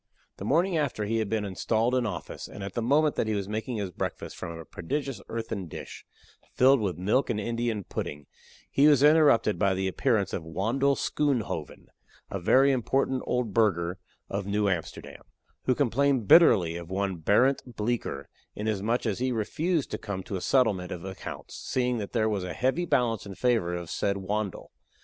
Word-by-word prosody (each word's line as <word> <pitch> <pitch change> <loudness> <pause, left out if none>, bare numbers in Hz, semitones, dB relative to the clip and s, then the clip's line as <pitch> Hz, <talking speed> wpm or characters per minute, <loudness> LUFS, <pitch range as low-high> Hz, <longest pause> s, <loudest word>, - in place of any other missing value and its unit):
The 95 - -6
morning 170 - +2
after 130 -8 -1
he 115 +2 0
had 110 -2 -1
been 110 -2 -1
installed 110 +5 0
in 125 -3 +1
office, 100 - -6
and 100 - -9
at 100 -1 -6
the 120 - -2
moment 145 +6 +3
that - - 0
he 110 - 0
was 100 -2 -2
making 110 +3 -3
his 100 -3 -3
breakfast - - -5
from 85 -2 -6
a 80 - -9
prodigious 135 - -4
earthen 110 -5 -4
dish, - - -9 0.5
filled 135 +1 +5
with 95 -6 -1
milk 105 +10 +1
and 110 -3 0
Indian 115 -1 -2
pudding, 75 -4 -5 0.5
he 140 +2 +5
was 145 -3 +5
interrupted 145 -8 +5
by 100 -2 +2
the 95 0 -1
appearance 100 0 0
of - - -2
Wandle 115 +12 +1
Schoonhoven, 125 - -2 0.5
a 100 - -2
very 135 +10 +4
important 130 +1 0
old 125 -4 -1
burgher 95 -5 +1 0.3
of 100 0 -4
New 105 0 +1
Amsterdam, 90 -5 -4 0.4
who 130 - +3
complained 135 -3 +1
bitterly 95 - +6
of 85 0 -8
one 95 -1 -1
Barent 125 - +2
Bleecker, 115 +3 -2 0.3
inasmuch 110 +3 -1
as 110 -2 -1
he 130 +1 0
refused 150 - -1
to - - -3
come 95 -3 -5
to 100 - -5
a 95 - -3
settlement 105 -9 +2
of 90 +1 -6
accounts, 95 -1 -8
seeing 125 -2 -1
that 100 - -5
there 110 -2 +1
was 105 -4 -1
a 90 -1 -4
heavy 135 +8 0
balance 115 -7 +1
in 100 - -8
favor 115 -9 +1
of 85 - -3
the - - -6
said 100 -1 0
Wandle. 100 +1 -3
110 Hz, 185 wpm, -27 LUFS, 95-130 Hz, 0.5 s, bitterly